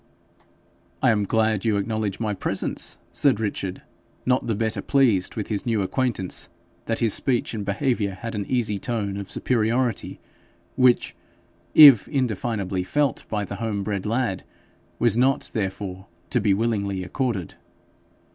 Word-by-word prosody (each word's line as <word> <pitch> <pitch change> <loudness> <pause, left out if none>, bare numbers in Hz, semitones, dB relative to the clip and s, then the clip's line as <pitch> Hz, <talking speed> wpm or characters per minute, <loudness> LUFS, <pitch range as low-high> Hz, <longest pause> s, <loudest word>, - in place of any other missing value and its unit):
'I 130 - +5
am 105 -2 +1
glad 110 -1 +1
you 110 -3 +1
acknowledge 105 0 -2
my 110 -2 -1
presence,' 95 - 0
said 135 -7 +2
Richard, 100 -3 -3 0.4
not 125 0 +1
the 115 - 0
better 110 +1 -1
pleased 120 -10 +2
with 105 - -4
his 105 -3 -2
new 110 -4 +1
acquaintance 105 -5 -2 0.4
that 115 - 0
his 115 -3 +1
speech 125 -4 0
and 105 -2 -3
behaviour 105 -2 -1
had 115 +4 -6
an 105 -2 -3
easy 110 -5 0
tone 105 -3 -2
of 100 -1 -6
superiority, 120 -1 0 0.6
which, 125 -7 +3 0.6
if 140 -8 +9
indefinably 110 -8 -1
felt 145 +5 0
by 105 -1 -1
the - - -6
home 110 -3 -2
bred 100 0 -3
lad, 115 -4 -1 0.5
was 120 -3 +3
not 135 +2 +1
therefore 95 -2 -4 0.2
to 125 - +2
be 100 -1 +2
willingly 100 -3 0
accorded. 100 - -3
110 Hz, 145 wpm, -24 LUFS, 100-120 Hz, 0.6 s, if